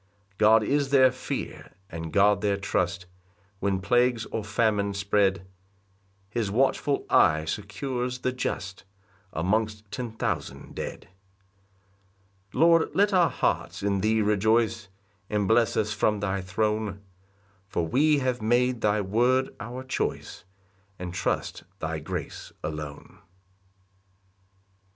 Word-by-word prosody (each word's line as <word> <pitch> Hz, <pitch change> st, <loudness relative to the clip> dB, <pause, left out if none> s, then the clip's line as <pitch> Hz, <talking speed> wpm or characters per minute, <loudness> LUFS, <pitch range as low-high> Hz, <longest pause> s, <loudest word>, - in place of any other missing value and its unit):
5 100 Hz, -, -35 dB
God 110 Hz, +1 st, +6 dB
is 140 Hz, +4 st, +1 dB
their 130 Hz, -2 st, +6 dB
fear, 125 Hz, -, -6 dB
and 80 Hz, -2 st, -6 dB
God 100 Hz, +3 st, +4 dB
their 100 Hz, -1 st, +1 dB
trust, 90 Hz, -2 st, -1 dB, 0.5 s
When 100 Hz, -1 st, 0 dB
plagues 120 Hz, +3 st, +2 dB
or 110 Hz, -, -2 dB
famine 105 Hz, -1 st, 0 dB
spread, 100 Hz, -1 st, +1 dB, 0.9 s
His 115 Hz, -3 st, -1 dB
watchful 135 Hz, +5 st, +1 dB
eye 80 Hz, -3 st, +4 dB
secures 120 Hz, -, -3 dB
the 130 Hz, -, -1 dB
just 100 Hz, -7 st, -4 dB, 0.5 s
Amongst 105 Hz, +5 st, -1 dB
ten 120 Hz, 0 st, -4 dB
thousand 110 Hz, -, -4 dB
dead. -, -, -6 dB, 1.4 s
6 -, -, -19 dB
Lord, 165 Hz, +3 st, +5 dB
let 205 Hz, +1 st, +3 dB
our 175 Hz, -3 st, +5 dB
hearts 125 Hz, -, -1 dB
in 100 Hz, -1 st, +1 dB
thee 110 Hz, +1 st, +2 dB
rejoice, 110 Hz, +2 st, +2 dB, 0.4 s
And 105 Hz, -2 st, 0 dB
bless 115 Hz, 0 st, +3 dB
us 105 Hz, 0 st, +1 dB
from 105 Hz, 0 st, +1 dB
thy 100 Hz, -1 st, -1 dB
throne; 105 Hz, +1 st, -1 dB, 0.7 s
For 85 Hz, -, -1 dB
we 150 Hz, -, +3 dB
have 130 Hz, -3 st, -1 dB
made 120 Hz, +2 st, +2 dB
thy 105 Hz, 0 st, +2 dB
word 120 Hz, +7 st, +1 dB
our 120 Hz, +2 st, -6 dB
choice, 130 Hz, -, -3 dB, 0.5 s
And 90 Hz, -1 st, -6 dB
trust 90 Hz, -, -2 dB
thy 80 Hz, -3 st, -3 dB
grace 75 Hz, -, -6 dB
alone. 75 Hz, -2 st, -7 dB
105 Hz, 125 wpm, -26 LUFS, 100-125 Hz, 1.4 s, God